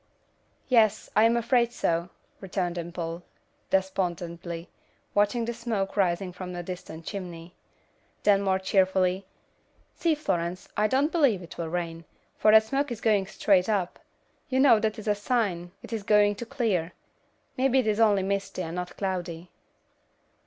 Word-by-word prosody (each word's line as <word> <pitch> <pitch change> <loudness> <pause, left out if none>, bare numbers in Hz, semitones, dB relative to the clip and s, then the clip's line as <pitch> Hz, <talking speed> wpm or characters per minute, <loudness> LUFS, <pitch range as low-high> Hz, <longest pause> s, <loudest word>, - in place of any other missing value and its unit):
"Yes, 225 -5 +3
I 215 - +6
am 230 +1 +4
afraid 235 0 +2
so," 170 -5 -1 0.3
returned 185 -2 -2
Dimple, 170 0 -5 0.5
despondently, 175 -3 -2 0.5
watching 210 +3 +2
the 235 - -2
smoke 225 -4 -3
rising 185 -1 0
from 180 0 -7
a 175 - -4
distant 165 -2 -8
chimney. 175 -4 -7 0.7
Then 200 -1 +4
more 190 -1 +2
cheerfully, 190 0 +1 0.7
"See 330 -2 +1
Florence, 175 - -2
I 210 +1 +3
don't 275 +6 +2
believe 265 - +2
it 170 - -11
will 165 -1 -3
rain, 165 -1 -4 0.3
for 215 - +5
that 220 0 +8
smoke 275 +4 -1
is 235 - -4
going 205 -4 +2
straight 195 -2 +2
up. 195 -5 -1 0.5
You 260 0 +1
know 265 -5 +6
that 215 0 -1
is 215 - -8
a 210 - +4
sign 205 -5 -1
it - - -8
is 225 - -2
going 205 0 +4
to 235 - -6
clear. 210 - -1 0.6
Maybe 265 0 +2
it 260 - +3
is 215 0 +1
only 205 -4 +4
misty 195 -1 -2
and 165 +1 -5
not 180 0 -5
cloudy." 180 -3 -4
195 Hz, 155 wpm, -27 LUFS, 175-220 Hz, 0.7 s, that